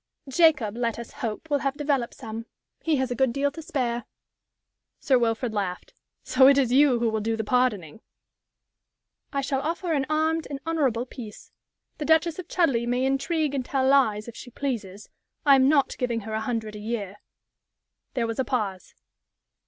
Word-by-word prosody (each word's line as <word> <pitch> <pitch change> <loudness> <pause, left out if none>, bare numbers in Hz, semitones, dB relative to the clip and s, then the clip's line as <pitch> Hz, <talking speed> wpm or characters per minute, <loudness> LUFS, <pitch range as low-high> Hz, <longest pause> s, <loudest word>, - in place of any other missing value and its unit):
"Jacob, 270 -7 +3
let 235 -1 -1
us 235 -1 -8
hope, 225 +6 -5
will 285 - +3
have 275 0 -1
developed 280 -5 -1
some. 225 +1 -7 0.3
He 320 -2 +1
has 260 -2 -1
a - - -1
good 265 0 +2
deal 280 +3 0
to 325 - -8
spare." 250 -8 -2 0.9
Sir 260 -3 +3
Wilfrid 230 0 0
laughed. 190 -4 -3 0.3
"So 260 0 +5
it 275 0 +6
is 260 -4 +2
you 275 -2 +5
who 235 0 +1
will 220 -1 0
do 225 +1 -1
the 220 - -1
pardoning?" 220 -6 0 1.3
"I 275 - -1
shall 270 0 -1
offer 335 +2 -2
an 275 -3 0
armed 315 +1 +1
and 280 -1 -5
honorable 270 -8 0
peace. 235 -4 -10 0.5
The 300 - -2
Duchess 320 +2 +3
of 365 - -6
Chudleigh 265 -10 +1
may 250 +2 +1
intrigue 280 +3 0
and 270 -2 -1
tell 260 +1 0
lies, 225 -6 +3
if 235 - -9
she 245 - -9
pleases. 220 -7 -4 0.4
I 280 - +7
am 265 0 +5
not 285 -2 +3
giving 235 -2 -1
her 220 +1 -7
a 220 - -1
hundred 220 -2 -3
a - - -7
year." 210 -3 -4 1.0
There 240 -3 +1
was 230 +1 -4
a - - +3
pause. 210 -7 -3
255 Hz, 185 wpm, -26 LUFS, 225-280 Hz, 1.3 s, I